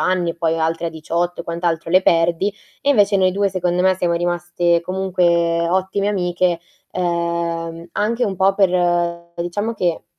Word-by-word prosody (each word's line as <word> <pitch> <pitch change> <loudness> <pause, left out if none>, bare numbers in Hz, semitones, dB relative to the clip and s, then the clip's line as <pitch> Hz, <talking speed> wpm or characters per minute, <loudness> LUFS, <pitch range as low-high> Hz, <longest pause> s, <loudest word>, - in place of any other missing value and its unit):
anni 185 -2 +1
e - - -7
poi 165 -1 -1
altre 165 +1 -1
a - - 0
18 170 +2 -3
e - - -24
quant'altro 170 -1 -2
le 185 +2 +6
perdi, 170 +2 +2 0.3
e 280 - -2
invece 205 -6 +4
noi 185 -1 +3
2 200 +1 0
secondo 180 -1 0
me 190 0 +4
siamo 175 -2 0
rimaste 175 0 0
comunque 170 -2 +1
ottime 190 +3 0
amiche, 180 -3 0 0.3
uhm, 170 -1 -2
anche 230 +6 0
un 195 - -2
po' 195 +2 +3
per, 195 -2 +3
uhm, 170 -1 0
diciamo 205 +6 -3
che, 175 -5 -1
175 Hz, 170 wpm, -20 LUFS, 170-190 Hz, 0.3 s, le